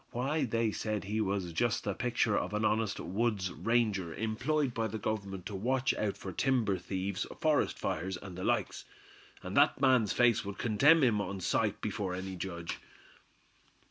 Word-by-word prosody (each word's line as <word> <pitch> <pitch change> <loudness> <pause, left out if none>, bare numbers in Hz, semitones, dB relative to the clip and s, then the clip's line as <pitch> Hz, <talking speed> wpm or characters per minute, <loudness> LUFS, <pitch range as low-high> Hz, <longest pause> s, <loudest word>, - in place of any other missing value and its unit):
Why, 135 +5 0
they 115 -1 0
said 110 -1 -2
he 105 +3 -1
was 95 -4 -1
just 120 +8 +1
the 100 - -1
picture 120 -2 +1
of 105 - -1
an 105 +1 +1
honest 110 -1 +1
wood's 100 -1 -1
ranger, 105 -8 0
employed 125 +5 0
by 115 -1 -1
the 110 +1 -4
Government 100 -3 -4
to 105 - -5
watch 125 +7 +1
out 105 -2 -2
for 95 - -6
timber 110 -3 +1
thieves, 95 +2 -3
forest 155 -2 +2
fires 95 +3 -2
and 95 -2 -9
the 90 - -6
likes. - - -1 0.6
And - - -5
that - - +4
man's 130 -6 +4
face 120 -4 +3
would 100 0 -6
condemn 140 +8 +4
him 110 -5 +3
on 95 0 -4
sight 105 +3 0
before 100 -3 -2
any 95 0 -5
judge." 85 -2 -5
105 Hz, 175 wpm, -32 LUFS, 95-120 Hz, 0.6 s, that